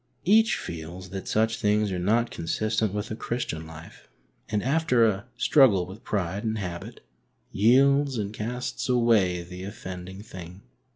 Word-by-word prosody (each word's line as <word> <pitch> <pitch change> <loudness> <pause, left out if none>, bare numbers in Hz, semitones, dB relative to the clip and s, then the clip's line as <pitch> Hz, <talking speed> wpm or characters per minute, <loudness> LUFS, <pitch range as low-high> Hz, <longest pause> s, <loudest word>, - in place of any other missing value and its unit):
Each 220 +4 +5
feels 85 +3 -7
that 95 -1 -6
such 110 +1 +1
things 105 -1 +1
are 90 - -2
not 115 +6 +1
consistent 110 +5 -1
with 105 +1 -4
a - - -2
Christian 95 -10 -4
life, 80 +1 -12 0.4
and, 105 -1 0
after 135 -4 +3
a 105 +1 -1
struggle 115 - +5
with 95 +5 -11
pride 100 0 -2
and 110 -1 -1
habit, 90 -4 -6 0.5
yields 135 +5 +4
and 105 -1 -3
casts 125 +4 -4
away 110 -8 +3
the 90 +1 -9
offending 95 -1 -8
thing. 90 -2 -10
105 Hz, 150 wpm, -26 LUFS, 90-115 Hz, 0.5 s, Each